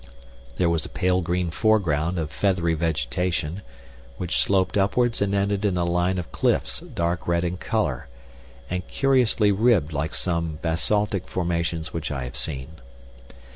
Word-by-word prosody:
There 85 - +2
was 85 -3 +1
a - - -6
pale 90 0 +1
green 85 0 -1
foreground 90 -5 +2
of 80 -2 -2
feathery 90 -4 +1
vegetation, 85 +2 -1 0.6
which 90 -1 0
sloped 95 -2 +2
upwards 115 +4 +2
and 100 0 +1
ended 100 0 0
in 100 -4 +1
a 85 - +1
line 90 +2 +1
of 90 -3 -5
cliffs - - 0
dark 85 +1 -3
red 85 0 +2
in 90 +1 -2
color, 85 - -1 0.6
and 90 0 -3
curiously 125 -6 +3
ribbed 100 -7 +3
like 75 +1 -2
some 85 -3 -1
basaltic 100 +4 0
formations 85 -2 -2
which 80 -1 -3
I 70 -3 -3
have 65 +2 -7
seen. 70 +3 -5
90 Hz, 150 wpm, -24 LUFS, 80-100 Hz, 0.6 s, curiously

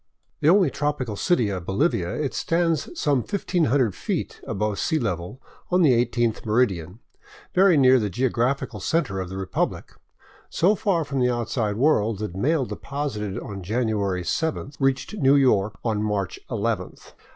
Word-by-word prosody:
The 150 - +3
only 190 +1 +5
tropical 145 -7 -2
city 120 - +1
of 90 -3 -5
Bolivia, 95 - 0
it 145 -3 -2
stands 165 -1 0
some 145 -4 +2
1500 145 - 0
feet - - -4
above 105 0 -2
sea 160 - +1
level 100 - -3 0.3
on 180 0 +3
the 145 - +6
i8th 120 -2 -1
meridian, 105 -4 0 0.5
very 185 -3 +5
near 130 -1 +6
the 105 -2 -1
geo 125 +8 0
graphical 125 -1 -1
center 95 - -1
of 95 -1 -4
the 95 - -6
republic, 95 -1 -2 0.6
so 185 +5 +3
far 185 -6 0
from 140 -2 -3
the 125 0 +3
outside 115 -3 -1
world 115 -6 +2
that 105 -3 -5
mail 135 - +1
deposited 120 -9 -4
on 100 -2 -6
January 100 -3 -1
7th 150 - -2
reached 135 +6 0
New 135 -3 +4
York 110 -7 +3
on 110 -2 0
March 105 -3 -2
nth. 110 -5 -3
120 Hz, 155 wpm, -24 LUFS, 105-145 Hz, 0.6 s, the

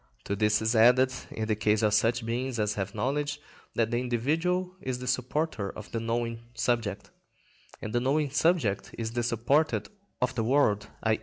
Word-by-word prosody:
To 100 - -2
this 105 +1 +2
is 110 +2 +1
added, 125 +3 +5 0.2
in 110 - -3
the 110 - +1
case 105 +1 +1
of 105 -1 +3
such 115 +3 +2
beings 120 +2 -2
as 105 -1 +1
have 100 -1 -4
knowledge, 145 +6 -1 0.4
that 115 0 +1
the 120 - +1
individual 165 +10 0
is 130 -1 -2
the 125 - -7
supporter 125 -3 -1
of 105 - -9
the 115 - -2
knowing 115 0 -2 0.2
subject, 110 -4 -1 0.7
and 110 - -4
the 120 - +3
knowing 140 +3 +1
subject 145 - +1
is 115 -1 -3
the 120 +1 -1
supporter 120 +6 +1 0.4
of 125 +1 0
the 115 -2 -1
world, 110 -5 +2 0.2
_i. 110 0 +2
120 Hz, 180 wpm, -28 LUFS, 110-130 Hz, 0.7 s, added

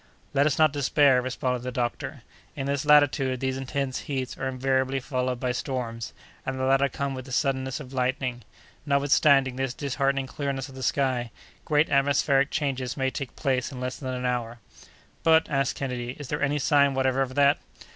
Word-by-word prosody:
"Let 140 +1 +4
us 145 - 0
not 155 -2 +4
despair," 140 -2 +4
responded 125 0 -2
the 125 +1 -4
doctor. 120 -1 -3 0.3
"In 135 - -3
this 140 +1 -1
latitude 135 -3 +4
these 130 0 -1
intense 135 0 -3
heats 130 -2 -2
are 135 - -3
invariably 130 +1 0
followed 130 -2 -2
by 125 0 0
storms, 120 -3 -4 0.3
and 135 - -3
the - - -1
latter 135 +1 +3
come 140 0 -3
with 130 -1 -6
the 135 - -11
suddenness 130 0 0
of 135 -3 -10
lightning. 125 -1 -1 0.4
Notwithstanding 140 -2 +3
this 130 -1 -2
disheartening 140 -1 0
clearness 135 0 -3
of - - -12
the 130 - -9
sky, 130 -2 0 0.4
great 150 +1 +2
atmospheric 140 0 +3
changes 135 -4 -2
may 130 -1 0
take 135 -2 -6
place 130 -2 -1
in 130 - -7
less 125 0 -3
than 130 -2 -4
an 125 0 -4
hour." 120 -1 -2 0.6
"But," 160 0 +4
asked 135 -2 +1
Kennedy, 125 -2 -4
"is 145 -3 -8
there 150 - -2
any 145 0 +1
sign 140 -1 +3
whatever 130 0 +1
of 130 -1 -2
that?" 145 0 +4
135 Hz, 185 wpm, -26 LUFS, 130-140 Hz, 0.6 s, Let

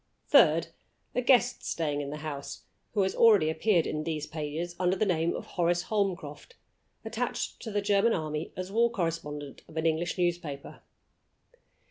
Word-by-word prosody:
Third, - - +5 0.4
a 250 - +1
guest 245 -1 +3
staying 150 -3 -1
in 140 - -5
the 150 - -5
house, 140 -2 -6 0.3
who 200 - +3
has 190 - 0
already 205 -9 +5
appeared 170 +1 +2
in 155 - -2
these 155 -2 -3
pages 160 +3 -4
under 180 0 +2
the 215 - +1
name 170 -3 +1
of - - -6
Horace 175 0 0
Holmcroft 195 - -2 0.5
attached - - -3
to 225 - -6
the 205 -1 -1
German 205 +3 +3
army 155 -1 -3
as 185 +1 -5
war 235 +3 +3
correspondent 160 -8 -4
of 160 - -12
an 160 - -1
English 165 +2 0
newspaper. 170 -6 -2
170 Hz, 160 wpm, -29 LUFS, 155-200 Hz, 0.5 s, Third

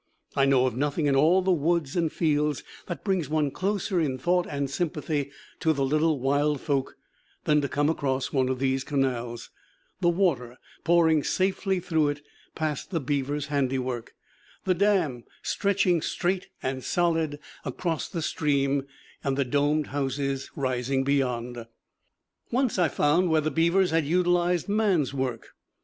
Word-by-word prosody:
I 135 - +4
know 130 -2 +4
of 125 -3 -1
nothing 145 +3 0
in 140 -1 +3
all 165 +7 +4
the 190 - +2
woods 165 -3 +1
and 165 -3 +1
fields 150 -3 0 0.2
that 170 -6 -5
brings 190 -7 0
one 150 -2 +1
closer 195 +1 -1
in 140 -5 0
thought 175 +6 +1
and 140 -1 -2
sympathy 150 -1 -2 0.3
to 160 -3 +2
the 140 -2 0
little 155 +1 +2
wild 145 +2 +1
folk 140 -2 -2 0.5
than 150 -1 +3
to 140 - -2
come 145 +2 +1
across 135 -4 -1
one 130 -2 +2
of 130 - -1
these 135 0 0
canals, 125 -5 -2 0.5
the 175 -2 +3
water 145 -10 0 0.3
pouring 165 -3 +4
safely 190 0 0
through 160 -4 +1
it 145 0 -4 0.3
past 155 -3 -2
the 175 -4 -1
beaver's 145 +1 -1
handiwork, 130 -3 -1 0.5
the 185 - +3
dam 180 - +1 0.2
stretching 190 -4 +1
straight 180 +3 -1 0.2
and 130 0 -2
solid 165 -4 +1 0.3
across 160 +4 -3
the 165 -3 -3
stream, 140 -3 0 0.4
and 135 -1 0
the 140 - +1
domed 145 +3 +1
houses 135 -1 -2
rising 130 0 0
beyond. 125 -4 -1 0.8
Once 250 -5 +1
I 175 - +4
found 165 +5 +2
where 160 -1 +4
the 155 +1 -1
beavers 170 +3 +3
had 160 -3 +1
utilized 175 +1 +2
man's 200 - +1
work. 130 -4 -3
150 Hz, 155 wpm, -26 LUFS, 135-175 Hz, 0.8 s, I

